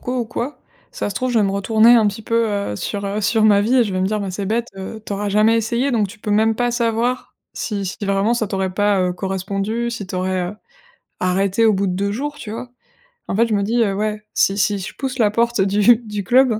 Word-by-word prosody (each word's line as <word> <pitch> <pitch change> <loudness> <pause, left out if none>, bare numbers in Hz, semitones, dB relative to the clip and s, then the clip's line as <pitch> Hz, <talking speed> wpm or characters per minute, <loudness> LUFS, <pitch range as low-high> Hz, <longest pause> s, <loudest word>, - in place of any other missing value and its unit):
co 250 +1 -3
ou - - -1
quoi, 240 +5 -5 0.3
ça - - -4
se - - -6
trouve, 255 +4 -1
je 235 - +3
vais 210 - +3
me 195 - +1
retourner 220 +4 +4
un 225 -3 +5
petit 205 +2 -6
peu, 230 +1 +1
heu, 200 - -2
sur, 200 - -4
heu, 205 +2 -2
sur 220 +1 +2
ma 205 -2 +5
vie» 225 +5 +1
et 245 - +5
je 205 - -4
vais 185 - -1
me 185 - +1
dire: 215 +1 -1
«Ben, 195 -2 -3
c'est 195 +2 -4
bête, 230 +3 -1
heu, 195 +3 -7
t'auras 205 0 -3
jamais 215 +3 +3
essayé, 235 +4 0
donc 220 -5 +1
tu 215 - -13
peux 210 - -5
même 220 +2 +3
pas 245 +2 0
savoir 235 +1 -1 0.2
si 205 -3 -3
si 180 - -5
vraiment, 200 +2 +1
ça 230 -2 -1
t'aurait 190 -1 -2
pas, 205 0 +2
heu, 180 -1 +1
correspondu, 195 +5 -3
si 215 -5 -5
t'aurais, 185 0 -2
heu, - - -10 0.7
arrêté 195 +4 +1
au 220 - +5
bout 195 0 0
de 180 - -1
2 200 +2 -1
jours», 290 +7 -4
tu 210 - -8
vois? 235 +3 -6 0.6
En - - -2
fait, 230 +3 +4
je 225 - -2
me 200 - +2
dis: 230 +3 +2
«Heu, 200 -3 0
ouais, 210 +1 -2
si 195 - +2
si 205 +1 +1
je 190 - -6
pousse 265 -2 -4
la 215 -3 +4
porte 235 -1 +1
du 205 +4 +5
du 210 -3 -6
club, 240 +1 +3
210 Hz, 260 wpm, -20 LUFS, 195-230 Hz, 0.7 s, un